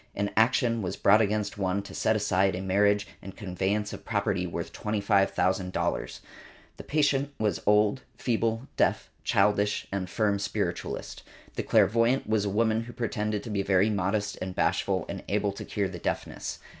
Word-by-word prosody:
An 100 0 -1
action 115 0 +3
was 90 - -3
brought 105 +3 +5
against 105 -1 -1
one 95 +1 0
to - - -10
set 110 - +1
aside 95 -2 +2
a 90 - -4
marriage 100 +2 +3 0.2
and 95 - -9
a - - -25
conveyance 100 +1 -2
of - - -8
property - - -1
worth - - -5
$25,000. 100 -3 0 0.6
The - - -8
patient 145 -2 +1
was 105 -5 0
old, 105 +4 +4 0.2
feeble, 115 0 -1
deaf, - - +1
childish 105 +1 +2
and 100 -1 -2
a - - -13
firm 100 +2 0
spiritualist. 100 - -3 0.3
The - - -2
clairvoyant 115 +4 +3
was 110 -1 +1
a - - 0
woman 110 +2 +1
who 120 - -9
pretended 105 -3 -2
to 115 - -6
be 100 -1 0
very 100 +2 +3
modest 100 +1 -1
and 95 0 -4
bashful 95 +2 +1
and - - -5
able 100 0 +1
to 100 - -7
cure 100 -2 -1
the 90 -2 -7
deafness. - - -3
105 Hz, 170 wpm, -28 LUFS, 95-110 Hz, 0.6 s, brought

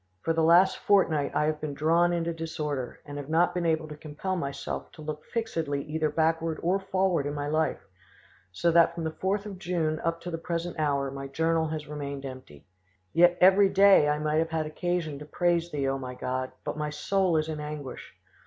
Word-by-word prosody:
For 165 - +1
the 165 - +1
last 175 +4 +5
fortnight 160 -8 +2
I 150 - +2
have 155 0 -1
been 150 -2 -4
drawn 165 +4 +3
into 170 -1 -1
disorder, 150 -5 -4
and 145 0 -6
have 145 0 -8
not 165 +2 +3
been 175 -2 -1
able 160 -1 0
to 150 - -8
compel 155 +5 -4
myself 140 -6 -4
to - - -12
look 150 0 -5
fixedly 165 -12 -2
either 155 0 -1
backward 160 0 0
or 180 +3 +2
forward 190 -5 0
in 145 - -3
my 145 0 -3
life, 155 -1 -1 0.6
so 170 - +1
that 170 0 +5
from 170 - -4
the 160 - -2
4th 195 +5 -2
of 195 -3 -7
June 165 -4 -1
up 165 0 -1
to 175 - -6
the 165 - -3
present 170 0 -4
hour 140 -3 0
my 135 0 -6
journal 160 +3 +1
has 155 -1 -5
remained 140 -2 -5
empty. 130 - -10 0.5
Yet 175 +1 +5
every 195 +2 +6
day 195 -7 +6
I 150 - +1
might 150 0 0
have 165 0 0
had 160 -1 -1
occasion 155 -2 -2
to 150 - -8
praise 170 +2 0
Thee, 145 -4 -2
O 135 0 -1
my 125 -1 -6
God, 130 +1 -3
but - - -4
my 150 0 -1
soul 180 +3 +1
is 155 0 0
in 155 -1 -4
anguish. 150 -3 -7
160 Hz, 210 wpm, -28 LUFS, 150-175 Hz, 0.6 s, every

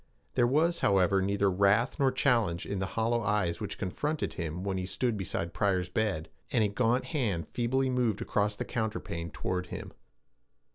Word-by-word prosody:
There 120 -2 +3
was, 165 +6 +2
however, 95 0 +3
neither 100 0 +2
wrath 100 +6 +3
nor 135 -1 +4
challenge 115 -10 +1
in 100 - -3
the 95 - -1
hollow 115 +1 +2
eyes 105 -6 0
which - - -4
confronted 150 +11 -2
him 85 0 -4
when 95 -1 -1
he 90 - -3
stood 120 +5 0
beside 85 -3 -3
Pryor's 95 -3 +1
bed, 95 -8 -1 0.2
and 115 - +3
a 105 - +2
gaunt 120 +4 +1
hand 105 - -1
feebly 130 +3 0
moved 125 -5 +1
across 105 0 0
the - - -4
counterpane 105 -7 -3
toward 90 +3 -3
him. - - -7
105 Hz, 175 wpm, -30 LUFS, 95-120 Hz, 0.2 s, nor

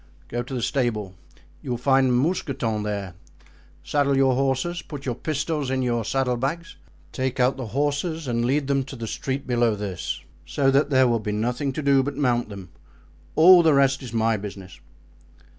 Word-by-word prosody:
"Go 120 - -2
to 125 +2 -6
the 120 - -2
stable; 110 -8 -1 0.5
you 140 - -8
will 120 - -1
find 135 +1 +3
Mousqueton 130 - -1
there; 100 -3 -4 0.7
saddle 140 -2 +1
your 135 -1 +4
horses, 135 +6 0
put 145 -3 -9
your 125 - -1
pistols 150 +1 -2
in 130 0 0
your 120 -2 0
saddle 125 +1 0
bags, 155 +7 -3 0.4
take 130 0 -3
out 125 +2 +3
the 130 -3 -6
horses 145 - -1
and 120 -1 0
lead 140 +4 +1
them 135 0 +1
to 135 - -9
the 115 -2 -6
street 135 +5 -4
below 120 -3 +1
this, 100 -3 -4 0.2
so 135 -1 +1
that 140 +1 +3
there 130 -2 +4
will 120 -1 +1
be 105 -1 -3
nothing 125 +6 -1
to 155 - -4
do 140 -1 +4
but 140 +1 -4
mount 120 -5 +1
them; 100 -4 -9 0.7
all 175 +3 +8
the 160 -3 +4
rest 135 0 +3
is 125 -4 -8
my 115 -1 +1
business." 95 -4 -9
130 Hz, 185 wpm, -24 LUFS, 115-140 Hz, 0.7 s, all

